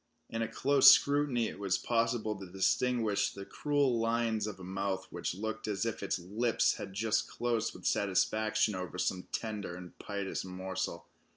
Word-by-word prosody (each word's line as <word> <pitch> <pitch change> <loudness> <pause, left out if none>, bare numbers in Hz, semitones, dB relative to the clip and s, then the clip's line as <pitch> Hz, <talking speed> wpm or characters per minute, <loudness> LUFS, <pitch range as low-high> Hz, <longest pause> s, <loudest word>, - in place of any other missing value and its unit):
In 115 - -2
a 115 - 0
close 135 +4 +6
scrutiny 140 -5 +4
it - - -8
was 95 -2 +1
possible 115 -2 0
to 95 -2 -10
distinguish 110 +2 +1
the 100 0 -9
cruel 140 -3 +1
lines 115 -2 0
of 100 -3 -6
a - - -9
mouth 95 0 -2
which - - -3
looked 110 +3 -4
as 105 +1 -1
if 115 - -3
its 100 - -1
lips 105 +7 +1
had - - -6
just 110 +1 +1
closed 120 -2 -1
with - - -12
satisfaction 110 +2 +2
over 90 -1 -5
some 90 0 -1
tender 105 -5 -4
and 90 0 -10
piteous 100 -1 -3
morsel. 95 -2 -4
110 Hz, 170 wpm, -32 LUFS, 95-115 Hz, -, close